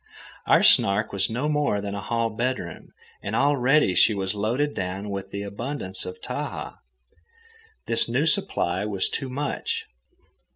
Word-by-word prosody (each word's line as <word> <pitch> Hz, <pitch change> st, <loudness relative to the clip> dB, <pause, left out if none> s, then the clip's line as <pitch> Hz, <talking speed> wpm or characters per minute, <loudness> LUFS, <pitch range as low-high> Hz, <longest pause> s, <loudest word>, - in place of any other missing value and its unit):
Our -, -, +5 dB
Snark 100 Hz, +2 st, +4 dB
was 95 Hz, -1 st, +3 dB
no 125 Hz, +6 st, -1 dB
more 150 Hz, -8 st, +1 dB
than 100 Hz, 0 st, -4 dB
a 100 Hz, -, -4 dB
hall 115 Hz, 0 st, -1 dB
bedroom, 115 Hz, -6 st, -3 dB, 0.3 s
and -, -, -3 dB
already 140 Hz, -5 st, +3 dB
she 110 Hz, -, +4 dB
was 95 Hz, -1 st, -1 dB
loaded 120 Hz, +8 st, 0 dB
down 95 Hz, +2 st, -4 dB
with 100 Hz, -1 st, -5 dB
the 100 Hz, 0 st, -5 dB
abundance 100 Hz, -2 st, -4 dB
of 90 Hz, -, -7 dB
Tahaa. -, -, -5 dB, 1.1 s
This 115 Hz, 0 st, +2 dB
new 130 Hz, +6 st, +1 dB
supply 160 Hz, -, +1 dB
was 100 Hz, -3 st, -1 dB
too 135 Hz, -, -3 dB
much. 150 Hz, -, -3 dB
110 Hz, 150 wpm, -25 LUFS, 100-140 Hz, 1.1 s, Our